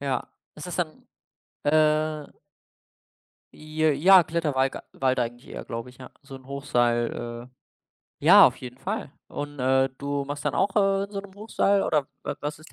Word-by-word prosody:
Ja. 135 -2 -2 0.3
Ist 150 - -9
das 175 - -5
dann, 165 -4 -4 0.6
äh 155 0 +1 1.2
J 155 0 0
ja, 185 +4 +7
Kletterwalg 150 -5 0 0.2
Wald 130 -1 +2
eigentlich 120 +1 -4
eher, - - -7
glaube 115 +1 -6
ich, 125 - -15
ja. 130 - -11
So 140 -1 -12
'n 130 -1 -16
Hochseil 120 -3 -1
äh - - -39 0.7
ja, - - +8
auf - - -10
jeden 125 0 -10
Fall, 195 -6 -4 0.2
und, 145 -1 -6
äh, 130 +1 +3
du 140 0 -3
machst 145 +1 -6
dann - - 0
auch, 195 +1 +1
äh, 195 -1 +2
in 200 - -11
so 200 - -3
'nem 200 -1 -14
Hochseil 200 -2 +1
oder 150 -3 0 0.2
wa - - -3
was 145 0 -4
ist 155 - -16
145 Hz, 175 wpm, -25 LUFS, 130-160 Hz, 1.2 s, ja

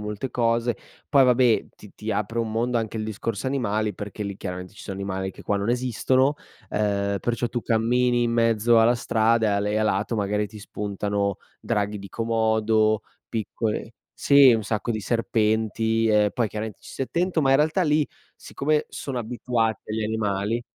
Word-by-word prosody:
molte 105 +4 -4
cose. 115 -1 +1 0.3
Poi 140 -3 +5
vabbè, 125 -2 +3
ti 105 - -14
ti 110 - -5
apre 105 +3 -1
un 115 - -2
mondo 120 +2 0
anche 115 -1 -2
il 110 - -2
discorso 110 +2 -4
animali, 110 -6 -1
perché 105 +2 -6
lì 100 -1 -5
chiaramente 90 -1 -6
ci 105 - -13
sono 95 - -6
animali 95 -1 -3
che - - -13
qua 100 - 0
non 100 +4 -1
esistono, 130 +3 +2 0.3
ehm, 100 -1 0
perciò 120 0 -1
tu 120 +1 -3
cammini 120 +2 +2
in 115 - 0
mezzo 115 0 +4
alla 120 +2 +4
strada 115 -1 +2
e - - +2
a 100 - +2
le 105 +1 -1
e 105 - 0
a 110 - +2
lato, 105 +3 0
magari 105 0 0
ti 105 - -11
spuntano, 100 -1 -2 0.2
draghi 105 -2 -1
di 100 - -9
Komodo, 110 -1 +1 0.3
piccole 110 0 -3 0.2
sì, 140 -2 +7
un 110 - -1
sacco 110 +2 -2
di 110 - -2
serpenti, 110 0 +1
e 105 -1 +4
poi 115 -4 +1
chiaramente 110 0 -6
ci - - -12
stai 135 - -3
attento, 175 -1 0
ma 135 - +3
in 135 - +6
realtà 155 +5 +2
lì, 150 -1 +3 0.3
siccome 150 +1 -1
sono 130 -3 -5
abituati 115 -2 -1
agli 110 0 -1
animali 105 +1 -1
110 Hz, 185 wpm, -24 LUFS, 105-120 Hz, 0.3 s, sì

